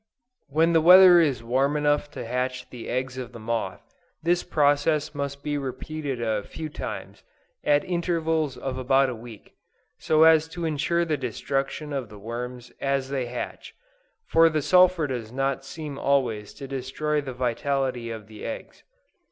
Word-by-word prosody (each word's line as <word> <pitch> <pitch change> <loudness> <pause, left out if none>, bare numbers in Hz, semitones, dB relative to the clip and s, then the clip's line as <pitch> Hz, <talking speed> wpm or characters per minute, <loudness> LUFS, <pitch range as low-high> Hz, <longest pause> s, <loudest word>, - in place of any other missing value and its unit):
When 160 +4 +2
the 165 - +5
weather 180 +1 +9
is 140 -8 +1
warm 135 +5 +1
enough 145 0 +1
to - - -6
hatch 125 +1 -2
the 120 -2 -8
eggs 130 0 -2
of 125 -2 -7
the 115 - -9
moth, 110 -4 -3 0.4
this 175 +1 +2
process 145 -1 +2
must 140 -1 -4
be 145 -1 -1
repeated 140 0 -4
a 110 -3 0
few 155 +9 -7
times, - - -7 0.4
at 145 0 +3
intervals 165 -5 -1
of 130 -1 -4
about 135 +1 +3
a 125 - -4
week, 115 -2 -12 0.5
so 155 0 +4
as 160 -1 +6
to 165 +1 -5
insure 165 +3 0
the 155 -2 0
destruction 135 +4 -3
of 130 -6 -3
the 105 - -11
worms 120 +3 -6
as 135 -1 0
they 135 -3 -2
hatch, 120 0 -6 0.5
for 165 0 +5
the 155 -2 -1
sulphur 180 -2 +5
does 120 -5 -4
not 135 +1 -1
seem 145 0 -7
always 120 -7 0
to 135 - -8
destroy 140 +3 -2
the 135 -2 -6
vitality 125 0 -1
of 110 -2 -7
the 110 0 -12
eggs. 280 - -7
140 Hz, 165 wpm, -25 LUFS, 125-155 Hz, 0.5 s, weather